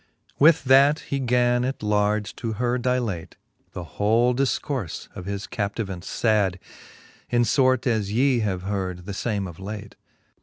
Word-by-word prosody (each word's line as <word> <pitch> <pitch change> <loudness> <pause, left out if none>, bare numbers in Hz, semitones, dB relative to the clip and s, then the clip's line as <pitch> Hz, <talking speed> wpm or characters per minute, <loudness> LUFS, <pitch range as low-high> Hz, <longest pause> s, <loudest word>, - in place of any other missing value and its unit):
With 155 +1 +6
that 135 +3 +5
he 140 - -3
gan 125 -1 +2
at 130 -2 -3
large 105 0 0
to 115 -2 -3
her 125 +3 0
dilate 120 -8 -2 0.4
The 90 - -5
whole 110 +9 +2
difcourfe 130 - -2
of 90 - -7
his 100 0 -4
captivance 100 -4 -4
fad, 105 -5 +2 0.7
In 120 0 +3
fort 130 +1 +2
as 110 -5 0
ye 125 +2 +2
have 95 -5 -2
heard 95 -3 -3
the 100 - -5
fame 100 -1 -2
of 85 -2 -9
late. 105 +1 -7
110 Hz, 150 wpm, -24 LUFS, 100-125 Hz, 0.7 s, With